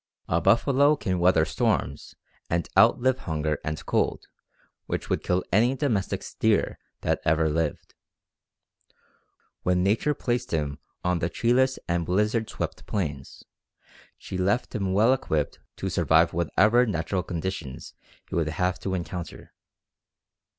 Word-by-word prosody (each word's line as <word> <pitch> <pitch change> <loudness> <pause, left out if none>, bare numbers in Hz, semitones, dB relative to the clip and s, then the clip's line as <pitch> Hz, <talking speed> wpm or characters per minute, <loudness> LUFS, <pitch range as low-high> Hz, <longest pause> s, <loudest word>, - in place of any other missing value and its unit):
A 85 +1 +1
buffalo 140 - +4
can 95 -9 -2
weather 85 -3 +4
storms 70 -2 -1 0.3
and 85 -1 0
outlive 130 +1 +4
hunger 75 - -2
and 75 -1 -4
cold - - 0 0.6
which - - -4
would - - +1
kill 90 +1 0
any 120 +7 +3
domestic 120 -9 -1
steer - - 0 0.2
that - - 0
ever 80 0 +2
lived. 80 0 -2 1.7
When 90 0 +1
nature 115 +9 +1
placed 120 -1 -2
him 75 -3 -2 0.2
on 90 -1 +1
the 85 +1 -1
treeless 130 +7 +2
and 85 0 0
blizzard 105 +6 0
swept - - -5
plains, 75 -9 -4 0.7
she 95 - -6
left 100 +7 0
him 100 -5 -1
well 110 +6 +5
equipped 80 - -2 0.2
to - - -4
survive 80 +1 +3
whatever 110 +9 +3
natural 90 -1 -1
conditions 85 -5 -5 0.3
he - - -12
would 80 -2 +1
have 90 +3 -1
to 95 -1 -2
encounter. 85 -2 -6
90 Hz, 130 wpm, -26 LUFS, 80-110 Hz, 1.7 s, well